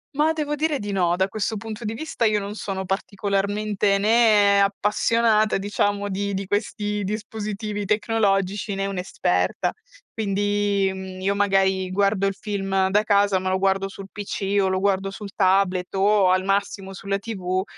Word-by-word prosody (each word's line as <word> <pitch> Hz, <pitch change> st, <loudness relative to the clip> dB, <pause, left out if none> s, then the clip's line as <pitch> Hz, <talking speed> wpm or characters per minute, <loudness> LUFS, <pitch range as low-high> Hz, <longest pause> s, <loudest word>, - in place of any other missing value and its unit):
Ma 305 Hz, +2 st, +3 dB
devo 300 Hz, -2 st, -2 dB
dire 300 Hz, 0 st, 0 dB
di 205 Hz, -3 st, -5 dB
no, 175 Hz, -3 st, +2 dB
da 190 Hz, +1 st, +1 dB
questo 215 Hz, +1 st, -3 dB
punto 225 Hz, +2 st, -7 dB
di 220 Hz, +2 st, -3 dB
vista 245 Hz, -4 st, -2 dB
io 210 Hz, -1 st, +3 dB
non 200 Hz, +1 st, -5 dB
sono 190 Hz, -3 st, -4 dB
particolarmente 200 Hz, +1 st, 0 dB
né 210 Hz, -2 st, +4 dB
appassionata, 215 Hz, +2 st, +2 dB
diciamo, 205 Hz, 0 st, -1 dB
di 200 Hz, 0 st, -2 dB
di 195 Hz, 0 st, -3 dB
questi 205 Hz, +1 st, -2 dB
dispositivi 210 Hz, 0 st, -4 dB
tecnologici, 205 Hz, -2 st, 0 dB
né 195 Hz, 0 st, -1 dB
un'esperta. 195 Hz, -2 st, -1 dB, 0.4 s
Quindi, 205 Hz, -1 st, 0 dB
mhmm, 190 Hz, -1 st, -8 dB
io 200 Hz, +1 st, +1 dB
magari 195 Hz, -2 st, +2 dB
guardo 195 Hz, +1 st, +1 dB
il 195 Hz, -, -2 dB
film 195 Hz, -3 st, 0 dB
da 210 Hz, +1 st, +4 dB
casa, 200 Hz, -2 st, +3 dB
ma 185 Hz, 0 st, -2 dB
lo 190 Hz, -, +1 dB
guardo 195 Hz, 0 st, +1 dB
sul 195 Hz, 0 st, -9 dB
PC 200 Hz, -1 st, -3 dB
o 190 Hz, -, +2 dB
lo 185 Hz, 0 st, 0 dB
guardo 195 Hz, 0 st, +1 dB
sul 200 Hz, 0 st, -9 dB
tablet 190 Hz, -1 st, +1 dB
o 195 Hz, -1 st, +4 dB
al 185 Hz, 0 st, +2 dB
massimo 195 Hz, 0 st, -1 dB
sulla 195 Hz, +1 st, -2 dB
TV, 190 Hz, -3 st, -3 dB
200 Hz, 160 wpm, -23 LUFS, 195-210 Hz, 0.4 s, né